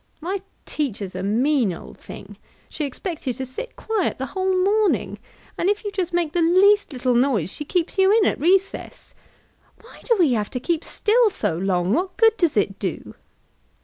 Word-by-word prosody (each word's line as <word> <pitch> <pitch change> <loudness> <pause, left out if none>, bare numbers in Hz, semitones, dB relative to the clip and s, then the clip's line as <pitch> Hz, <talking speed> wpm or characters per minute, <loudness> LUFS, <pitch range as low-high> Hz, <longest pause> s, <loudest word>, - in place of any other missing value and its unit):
"My 370 +4 -3 0.2
teacher's 210 -10 -3
a 185 - -5
mean 235 +3 +1
old 170 - -10
thing; - - -11 0.3
she 300 - -3
expects 315 +3 -6
you 255 - +1
to 260 +3 -5
sit 260 - -8
quiet 440 -4 -2
the 265 - -3
whole 375 +4 -1
morning, 415 +1 +1 0.4
and 360 - +2
if 410 0 0
you 410 - -4
just 370 -3 -2
make 345 -3 -1
the 350 - +1
least 385 +5 +4
little 255 -2 0
noise, 240 - +1
she 295 - -6
keeps 355 +4 -2
you 385 +1 +5
in 435 -1 +4
at - - 0
recess. 380 +6 0 0.7
Why 465 - -16
do 470 - +3
we 325 -9 +3
have 210 -3 -1
to 250 - -4
keep 330 +5 -1
still 455 +1 +2
so 170 - -2
long? 180 +1 0
What 370 +3 -1
good 450 -2 +5
does 335 - +1
it 200 -1 0
do?" 185 -5 -5
330 Hz, 190 wpm, -22 LUFS, 245-390 Hz, 0.7 s, you